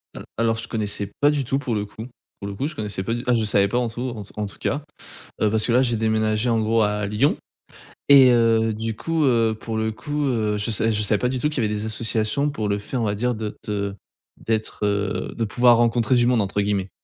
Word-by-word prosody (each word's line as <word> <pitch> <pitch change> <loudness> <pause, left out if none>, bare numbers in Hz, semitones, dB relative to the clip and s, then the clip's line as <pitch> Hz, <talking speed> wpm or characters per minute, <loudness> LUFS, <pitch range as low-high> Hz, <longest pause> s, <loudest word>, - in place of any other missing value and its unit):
Heu, - - -8
alors 115 -1 +1
je - - -5
connaissais 105 -2 -3
pas 145 - +5
du 145 -2 0
tout, 135 +3 -1
pour 120 -5 -2
le 105 0 -2
coup 110 +3 -9 0.3
pour 100 - -6
le 100 - -5
coup, 135 +9 -2
je 155 - -6
connaissais 105 -6 -4
pas 115 +4 -2
du 120 - -5
t 125 - 0
ah, - - +4
je 115 -2 +1
savais 100 -1 +3
pas 120 +4 0
en 120 -2 -1
tout 120 +3 -4
en 105 - -6
tout - - -14
en 105 - -1
tout 100 - -10
cas, 145 +1 -2 0.6
heu, 110 - +3
parce 110 0 0
que, - - -1
là, 125 +2 +4
j'ai 120 -3 +1
déménagé 110 +1 0
en 115 - +2
gros 110 +1 +2
à 105 0 0
Lyon 105 +8 +1 0.7
et 135 -3 +8
heu, 115 -2 +3
du 110 0 -4
coup, 165 +2 -1
heu, 115 -4 +3
pour 110 -1 -4
le 110 0 -1
coup, 150 +6 -4
heu, 110 -4 0
je 105 +3 0
sav 110 +1 +3
je 105 -1 +1
savais 105 0 +3
pas 125 - 0
du 130 0 -2
tout 150 - +1
qu'il 145 -4 -2
y 110 - +1
avait 105 - -2
des 105 - -3
associations 115 +5 -1
pour 110 -7 -3
le 100 - +1
fait, 105 - -7
on 120 - 0
va 105 -1 0
dire, 125 +2 -1
de 110 -1 -4
te 100 -1 -3 0.5
d'être, 110 -1 -2
heu 100 0 -1
de 115 - 0
pouvoir 120 +3 +4
rencontrer 120 +1 +2
du 120 - +4
monde 120 -3 +3
entre, 100 +1 -1
guillemets. 100 -2 -1
110 Hz, 270 wpm, -22 LUFS, 105-125 Hz, 0.7 s, et